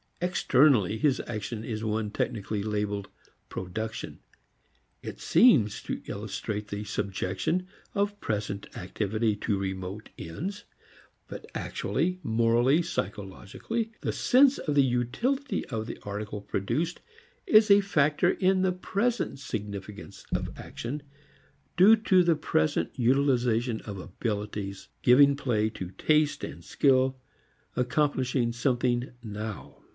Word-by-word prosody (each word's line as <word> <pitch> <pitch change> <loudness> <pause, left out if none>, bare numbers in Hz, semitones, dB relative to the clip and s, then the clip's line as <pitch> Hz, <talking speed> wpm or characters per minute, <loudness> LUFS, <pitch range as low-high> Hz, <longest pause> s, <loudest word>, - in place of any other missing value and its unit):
Externally 135 - +3
his 135 +2 +2
action 110 -1 -4
is 110 -1 -4
one 110 -1 -1
technically 105 -1 -2
labeled 105 -1 -2 0.4
"production." 110 +5 -5 0.8
It - - -7
seems 130 - +4
to - - -4
illustrate 105 -1 -4
the 105 0 -4
subjection 100 - -2 0.3
of 205 0 0
present 105 -2 -3
activity 105 +4 -1
to 105 -1 -1
remote 95 +2 -5
ends. 175 - -5 0.6
But - - -9
actually, 180 +2 -1
morally, 115 +7 +3
psychologically, 105 - -4
the - - -1
sense 265 +2 +4
of 150 - -2
the 140 - +6
utility 135 - -1
of 110 -3 -4
the - - -6
article 105 0 -5
produced 155 - -2 0.5
is 215 - +6
a 200 0 +8
factor 160 -2 +2
in 185 0 +2
the 190 0 +2
present 200 - -1
significance 100 -5 -7
of - - -1
action 140 +6 -6 0.8
due 200 +5 +8
to 190 -4 +4
the 170 -1 +3
present 155 0 0
utilization 125 -3 +2
of 100 -3 -7
abilities, 100 0 -4
giving 140 +3 +6
play 115 -6 0
to 95 -4 -7
taste 150 +8 +1
and 85 - -7
skill, 130 - +2 0.6
accomplishing 130 -2 +1
something 120 0 0
now. 105 - -6
120 Hz, 115 wpm, -28 LUFS, 105-155 Hz, 0.8 s, a